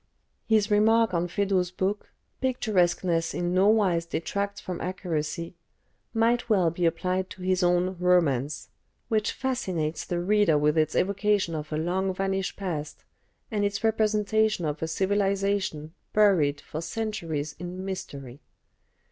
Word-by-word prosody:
His 215 -1 +3
remark 220 0 +4
on 170 0 +1
Feydeau's 190 -1 0
book, 190 +3 -3 0.3
"Picturesqueness 180 -9 +1
in 175 0 -1
no 190 +2 +4
wise 190 -6 +3
detracts 200 +4 -3
from 180 -3 -6
accuracy," 170 -2 -3 0.6
might 235 +1 +1
well 185 -6 +3
be 170 +1 +1
applied 185 +3 -1
to 185 - -10
his 185 0 +1
own 180 +1 +2
"Romance," 155 -7 +1 0.4
which 215 -1 +1
fascinates 185 -12 -2
the 175 - -2
reader 195 -3 +3
with 150 +1 +2
its 155 -1 +1
evocation 200 -2 +1
of 155 -1 -5
a 155 - -1
long 185 +4 -1
vanished 195 0 -1
past 160 -6 -5 0.5
and 210 -2 0
its 200 +1 -1
representation 215 -3 +2
of 150 0 -3
a 160 - -1
civilisation 195 -3 0 0.2
buried 170 -9 +3
for 155 - -6
centuries 165 -6 -3
in 180 +2 -6
mystery. 140 -8 -7
185 Hz, 135 wpm, -27 LUFS, 165-205 Hz, 0.6 s, remark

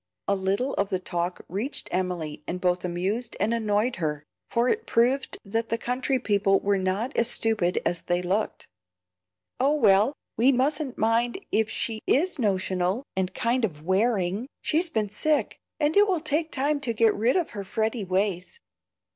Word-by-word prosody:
A 200 - +3
little 200 +8 -1
of 200 0 +1
the 190 - 0
talk 175 -1 -3
reached 215 - -1
Emily 175 -5 -2
and 180 - -3
both 180 -1 0
amused 190 +7 -2
and 215 +4 +1
annoyed 220 0 0
her, 150 -3 -2 0.3
for 235 +1 +1
it 445 - 0
proved 255 +4 +1
that 225 +3 -2
the 230 - 0
country 255 +3 -1
people 200 -4 +2
were 200 -1 +1
not 195 +8 -1
as 235 - +2
stupid 215 -7 +1
as 175 - 0
they 175 0 0
looked. 195 +5 -1 0.9
"Oh, 280 +4 +3
well, 215 -1 +4 0.2
we 245 +5 +5
mustn't 275 +1 0
mind 230 +5 +1
if 220 0 +2
she 220 -1 -2
IS 335 +3 +2
notional 190 0 0
and 185 -1 -1
kind 245 0 0
of 155 -8 -2
wearing; 195 +3 +1
she's 330 +3 +1
been 215 -7 -1
sick, 300 +8 0 0.2
and 300 0 +1
it 410 +1 +6
will 370 -4 +1
take 315 +2 -1
time 285 +2 0
to 255 -5 -1
get 225 0 +4
rid 230 +4 +1
of 355 -4 0
her 205 -3 -5
fretty 220 +3 -1
ways. 190 - -1
220 Hz, 170 wpm, -26 LUFS, 190-255 Hz, 0.9 s, it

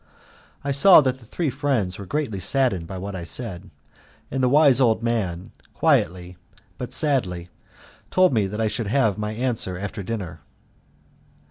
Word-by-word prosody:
I 140 - -2
saw 160 +8 +8
that 130 -2 -1
the 120 - -17
three 160 +1 -2
friends 125 -11 -1
were 100 - -8
greatly 140 -8 -2
saddened 100 -6 0
by 95 - -7
what 100 +1 -6
I 90 - -5
said, 95 0 -5 0.6
and 135 - -1
the 125 - +3
wise 140 -2 +5
old 115 -2 +2
man, 95 -7 -2 0.2
quietly 90 +1 +1 0.4
but 125 - -5
sadly, 95 - -1 0.6
told 185 -4 +3
me 105 -4 +1
that 105 +3 -6
I 110 - +1
should 110 0 -3
have 110 -4 +1
my 105 0 -3
answer 115 -6 -2
after 100 +1 -5
dinner. 100 -3 -5
110 Hz, 160 wpm, -23 LUFS, 95-130 Hz, 0.6 s, saw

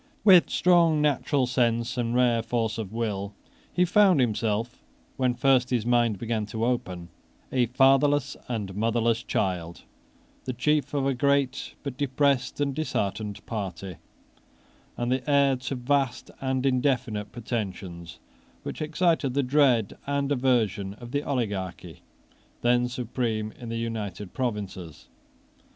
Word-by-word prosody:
With 185 -4 +7
strong 170 -3 +4
natural 145 -2 +1
sense, 120 -1 0
and 120 -1 -1
rare 120 -2 +3
force 115 -1 -2
of 105 -4 -5
will, 105 -3 -3 0.4
he 180 - +2
found 185 -2 +5
himself, 115 -1 -1 0.3
when 125 -2 +1
first 130 0 +3
his 120 -4 0
mind 120 -3 +2
began 110 -1 -2
to 110 +1 -2
open, 90 -8 -2 0.4
a 125 -2 +2
fatherless 135 +3 +3
and 105 -6 -3
motherless 115 +2 +1
child, 85 -6 -2 0.6
the 130 - -2
chief 145 +3 0
of 140 -1 +1
a 135 - +2
great 140 0 0
but 140 -3 -5
depressed 140 -1 +1
and 140 -1 0
disheartened 105 -8 -3
party, 95 -4 -5 1.0
and 120 +1 -1
the 130 +2 -1
heir 140 -1 +4
to 130 +2 -4
vast 130 0 -1
and 130 0 -1
indefinite 125 -6 0
pretensions, 95 -7 -5 0.5
which - - -6
excited 155 -4 +1
the 140 - +2
dread 125 -5 +2
and 140 0 -1
aversion 115 -7 +1
of 120 +1 -11
the 145 +1 0
oligarchy 105 -10 -4 0.6
then 120 0 +3
supreme 115 -3 -2
in 120 0 -10
the 115 - -3
United 105 -4 -5
Provinces. 100 - -5
120 Hz, 135 wpm, -26 LUFS, 110-135 Hz, 1.0 s, With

